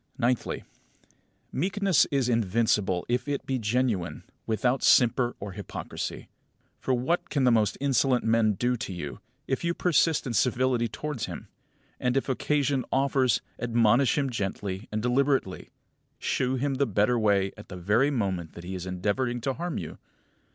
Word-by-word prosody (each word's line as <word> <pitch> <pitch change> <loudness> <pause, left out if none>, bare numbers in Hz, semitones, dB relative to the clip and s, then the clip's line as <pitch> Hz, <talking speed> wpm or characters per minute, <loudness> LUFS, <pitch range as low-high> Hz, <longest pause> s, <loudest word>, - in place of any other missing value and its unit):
Ninthly: 125 0 0 0.9
Meekness 195 +2 +2
is 135 -3 +1
invincible 105 -5 +1
if 125 +2 -1
it 145 -1 -2
be 130 -1 -1
genuine, 110 -5 -1 0.2
without 125 +4 +1
simper 120 0 +4
or 100 0 -6
hypocrisy. 100 0 -6 0.5
For - - -2
what 130 +8 0
can 140 -3 0
the 125 - +5
most 110 -3 +2
insolent 135 -2 +2
of 115 - 0
men 115 -2 +3
do 120 +5 0
to 110 - -5
you, 85 -1 -6 0.3
if 130 - -1
you 170 0 0
persist 165 -3 +2
in 125 - -3
civility 125 0 +2
towards 140 +3 -4
him; - - -8 0.5
and, 125 +1 +1
if 135 - -1
occasion 140 0 +1
offers, 135 -3 +2 0.2
admonish 120 +2 +3
him 140 -3 0
gently 100 -2 -4
and 110 +1 -2
deliberately, 130 -5 +1 0.5
shew 130 0 0
him 135 +2 0
the 140 - +2
better 105 +3 +2
way 100 -3 +2
at - - -13
the 90 - -7
very 105 +10 +2
moment 95 - -2
that 85 - -10
he 90 +2 -6
is 90 0 -5
endeavouring 105 +7 -1
to 135 +3 -1
harm 175 +4 -4
you? - - -6
120 Hz, 160 wpm, -27 LUFS, 105-135 Hz, 0.9 s, the